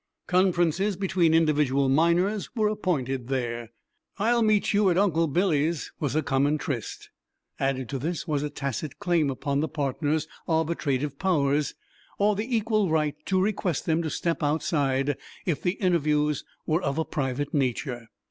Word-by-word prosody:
Conferences 180 +1 +2
between 180 -4 +2
individual 150 -4 +3
miners 170 +8 +2
were 215 -2 +2
appointed 135 - -2
there. 120 -3 -2 0.5
"I'll 235 +3 +2
meet 215 -2 +2
you 205 -1 +4
at 175 - +2
Uncle 165 -4 +3
Billy's" 160 -1 0
was 145 -2 -1
a 155 - +2
common 140 +3 +2
tryst. 135 -6 -5 0.5
Added 130 -2 -1
to 135 - -3
this 165 +5 -3
was 150 -3 0
a 150 - -2
tacit 140 0 -4
claim 175 -7 +1
upon 140 +1 -1
the 155 - 0
partners' 150 +1 -1 0.2
arbitrative 150 -4 0
powers, 150 -6 +1 0.4
or 205 +1 +3
the 225 +5 -2
equal 215 -3 +1
right 155 -2 +1
to 190 -1 +2
request 185 -5 0
them 165 -1 +1
to 160 - -2
step 170 +2 -2
outside 145 -3 0 0.3
if 165 -6 -1
the 180 - +1
interviews 150 -6 +1 0.2
were 160 +2 +1
of 140 -3 -2
a 160 - 0
private 135 0 -2
nature. 125 -3 -1
155 Hz, 155 wpm, -26 LUFS, 140-180 Hz, 0.5 s, you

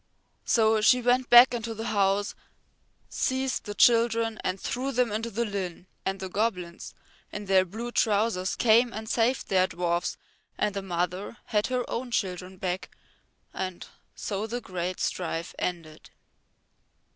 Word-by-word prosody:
So 220 -2 +3
she 250 +3 +5
went 250 +1 +2
back 240 +1 +9
into 230 -1 -3
the 225 +1 -5
house, 200 -1 +1 0.7
seized 260 0 -1
the 205 -1 -5
children 230 -1 +3
and 185 +1 -2
threw 260 +7 -2
them 245 -3 +1
into 225 +2 -2
the 235 +2 -1
Llyn, 190 -4 -4 0.2
and 195 0 -2
the 190 - -4
goblins 180 -4 -3 0.4
in 205 0 -6
their 190 -1 +4
blue 225 +6 -6
trousers 205 -4 +1
came 235 +1 +4
and 220 +1 -6
saved 240 +4 +1
their 185 -1 +3
dwarfs 175 -1 -1 0.4
and 210 - 0
the 200 - -3
mother 180 +3 -3
had 210 -1 0
her 250 -1 -1
own 245 +1 -4
children 185 -4 -3
back 185 0 -3 0.6
and 185 -2 -4 0.3
so 205 +1 -3
the 240 +2 -3
great 185 -4 -4
strife 165 -2 -2
ended. 165 -4 -5
210 Hz, 145 wpm, -27 LUFS, 185-235 Hz, 0.7 s, back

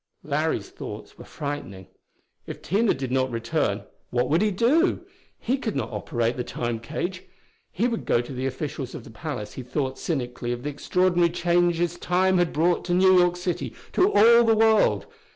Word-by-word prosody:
Larry's - - -1
thoughts - - -9
were - - -10
frightening. 140 -10 -6 0.6
If - - -8
Tina 210 +5 +2
did 130 -1 -4
not 130 0 +1
return, 115 -1 -1 0.3
what 125 +1 0
would 165 +4 +3
he 215 - +3
do? 245 - +2 0.4
He 260 +3 -1
could 225 -6 -3
not - - -2
operate 120 -4 -1
the 125 - -2
Time 120 -1 -3
cage. 175 +9 -4 0.5
He 225 +7 0
would 230 -2 -4
go - - +3
to 120 +3 -5
the 130 +1 -2
officials 135 0 -5
of - - -8
the - - -12
palace; 120 -3 -6
he - - -6
thought 130 +1 -3
cynically 125 -6 -3
of 120 0 -7
the 150 - -2
extraordinary 175 +4 +2
changes 175 0 +1
time 185 +1 +2
had 175 -1 +2
brought 170 +3 +1
to 175 - +1
New 185 +1 +5
York 180 0 +3
City, 180 -1 -3 0.2
to 375 +3 +3
all 235 +3 +7
the 225 -1 +4
world. 220 -1 +3
170 Hz, 185 wpm, -25 LUFS, 130-190 Hz, 0.6 s, all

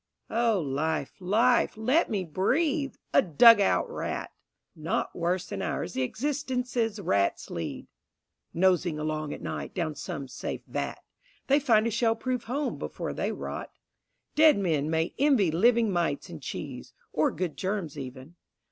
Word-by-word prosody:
O 230 -3 +2
Life, 150 0 -1
Life, 220 +6 +2
let 255 +10 +2
me 200 -4 -1
breathe, 275 - 0 0.2
a - - +7
dug 205 +6 +7
out 195 - +2
rat! - - -4 0.4
Not 160 0 -2
worse 175 +1 0
than - - -5
ours 175 - -3
the 130 - -1
existences 250 - -1
rats 100 - 0
lead 85 -2 -5 0.7
Nosing 175 -2 +2
along 155 -1 -2
at - - -7
night - - -5
down 165 -4 -1
some 140 -1 -6
safe 135 +2 -5
vat, - - -4 0.4
They 280 +2 +4
find 225 -6 +3
a 230 - 0
shell 225 +1 +2
proof 250 +1 -3
home 275 +5 -2
before - - -4
they - - -1
rot. - - -5 0.6
Dead 310 -3 +6
men 160 -7 0
may 160 +1 0
envy 260 - +4
living 225 +5 +3
mites 170 -3 -1
in 165 - -7
cheese, 135 -2 -7 0.2
Or 155 - +3
good 170 -1 -3
germs 190 -6 -3
even. 135 +4 -9
185 Hz, 150 wpm, -28 LUFS, 155-235 Hz, 0.7 s, a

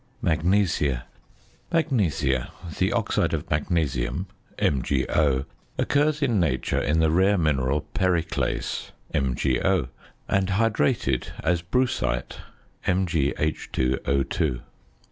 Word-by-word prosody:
MAGNESIA. 80 -6 +1 0.7
Magnesia, 90 - +1 0.3
the - - +2
oxide - - +1
of - - -5
magnesium 75 0 0 0.3
(MgO) 70 0 +1 0.3
occurs 150 +1 +2
in 120 -7 +2
nature 85 -4 0
in 75 +3 +1
the 80 -1 +3
rare 95 +4 +4
mineral 75 -3 +1
periclase 85 -3 -1 0.2
(MgO); 70 +4 +1 0.4
and 95 -1 +1
hydrated, 95 - +1 0.2
as 85 +1 +2
brucite 90 - -1 0.5
(MgH_O_). 70 -6 0
80 Hz, 85 wpm, -25 LUFS, 70-95 Hz, 0.7 s, rare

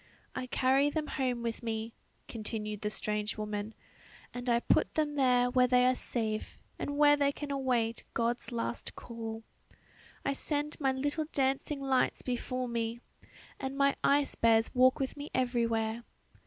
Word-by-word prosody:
"I 255 - -4
carry 265 +3 +3
them 305 0 -2
home 250 -4 -1
with 230 -1 -3
me," 225 -1 -3 0.3
continued 215 -2 -4
the 210 - -1
strange 210 0 -2
woman, 210 0 -4 0.6
"and 245 0 -4
I 235 0 +4
put - - +2
them 300 -2 +1
there 250 -3 +3
where 250 0 +4
they 250 0 +4
are 255 - +5
safe, 220 -4 -3 0.2
and 285 0 -3
where 290 0 +7
they 285 -1 +2
can 285 0 -6
await 245 -4 0
God's 240 +2 0
last 235 0 -4
call. 225 -1 -6 0.8
I 275 - +2
send 295 +1 -2
my 270 -3 +2
little 290 +4 -1
dancing 275 +1 0
lights 265 -2 +1
before 255 0 -2
me, 230 0 -2 0.6
and 270 0 -4
my 280 0 +3
ice 280 0 +3
bears 225 -1 +3
walk 255 0 +5
with 270 -1 -2
me 290 0 -7
everywhere. 230 -2 0
250 Hz, 155 wpm, -31 LUFS, 230-275 Hz, 0.8 s, where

